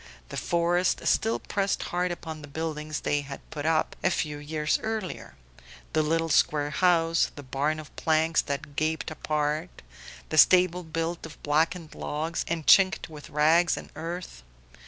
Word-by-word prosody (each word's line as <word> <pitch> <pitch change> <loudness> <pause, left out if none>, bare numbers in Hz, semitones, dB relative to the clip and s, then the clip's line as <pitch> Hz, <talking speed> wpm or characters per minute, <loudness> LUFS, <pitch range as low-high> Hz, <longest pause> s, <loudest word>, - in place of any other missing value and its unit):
The - - -7
forest 175 +1 +1
still 225 +1 +2
pressed 200 -1 -1
hard 180 0 +1
upon 160 -2 -6
the 145 - -10
buildings 155 0 -4
they 145 0 0
had 140 -1 -8
put 150 0 -3
up 160 -1 +1
a - - +4
few 150 -4 -2
years 150 +1 -1
earlier: 220 -5 -4 0.6
the 155 - +3
little 165 +2 0
square 145 -1 +2
house, 165 0 +3
the 145 - -9
barn 145 +4 -1
of 155 - -11
planks 160 0 +2
that 140 0 -5
gaped 155 +1 -1
apart, 150 +2 -2 0.5
the 155 - +3
stable 180 0 +6
built 165 0 -3
of 155 - -15
blackened 160 +2 0
logs 160 +3 -3
and 165 -2 -2
chinked 190 -3 +5
with 150 -1 -10
rags 160 +4 +3
and - - -9
earth. 165 - -6
160 Hz, 155 wpm, -27 LUFS, 150-170 Hz, 0.6 s, stable